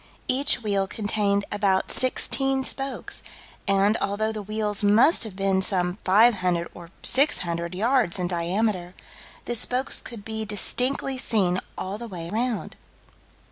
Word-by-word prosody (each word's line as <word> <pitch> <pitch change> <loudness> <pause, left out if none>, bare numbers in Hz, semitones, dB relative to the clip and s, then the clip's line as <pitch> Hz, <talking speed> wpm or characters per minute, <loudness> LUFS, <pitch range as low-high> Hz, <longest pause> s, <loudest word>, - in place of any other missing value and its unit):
Each 260 -2 +2
wheel 200 -2 0
contained 205 -1 -1
about 200 -2 0
sixteen 270 +1 0
spokes, 270 0 -3 0.5
and, 200 +2 +2
although 215 +2 -2
the 215 -1 -6
wheels 210 0 0
must 220 +11 +5
have 210 -4 -9
been 195 -1 0
some 180 -1 -1
500 185 -4 +3
or 170 -1 -12
600 175 - +1
yards 230 -2 +1
in 180 -1 -2
diameter, 180 +1 -2 0.5
the 240 - -3
spokes 250 +3 +1
could 225 -5 -9
be 220 0 -4
distinctly 255 +5 0
seen 185 -7 +6 0.2
all 195 +3 -5
the 235 - -7
way 170 -5 -7
round. 235 +1 -3
205 Hz, 135 wpm, -24 LUFS, 190-235 Hz, 0.5 s, seen